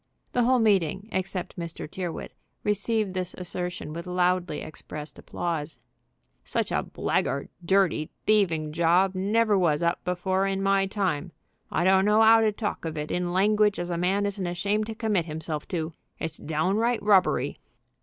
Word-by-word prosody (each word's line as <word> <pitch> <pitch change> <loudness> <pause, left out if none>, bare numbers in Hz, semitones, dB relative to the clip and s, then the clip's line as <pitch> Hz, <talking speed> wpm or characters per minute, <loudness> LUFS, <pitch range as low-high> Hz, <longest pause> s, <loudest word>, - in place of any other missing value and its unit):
The 245 -1 +2
whole 255 +1 +4
meeting, 200 -3 +2
except 190 -2 -3
Mr. 170 -2 -6
Tyrrwhit, 175 +1 -5 0.3
received 210 -1 0
this 185 -1 -3
assertion 180 -3 -4
with 170 +2 -6
loudly 180 -2 +1
expressed 150 -1 -8
applause. 160 -3 -4 0.7
"Such - - -1
a - - +1
blackguard, 140 - -1
dirty, 185 -4 +2 0.2
thieving 170 -8 +2
job 175 +4 +3
never 210 +3 +2
was 165 -3 +2
up 170 +1 0
before 185 +2 0
in 195 0 -1
my 195 0 +3
time. 185 -5 -2 0.4
I - - +1
don't 190 +1 +4
know 210 +1 +5
'ow 225 0 +7
to 220 -1 +3
talk 205 0 -4
of 160 -1 -4
it 150 0 -4
in 180 0 -1
language 210 +2 +3
as 175 0 -3
a - - 0
man 195 +3 +1
isn't 200 -2 -2
ashamed 200 +5 -1
to 225 - -5
commit 210 -6 0
himself 155 -1 -4
to. 165 -3 -3 0.2
It's 160 0 -5
downright 195 +10 0
robbery." 200 -3 +3
185 Hz, 160 wpm, -26 LUFS, 170-205 Hz, 0.7 s, ow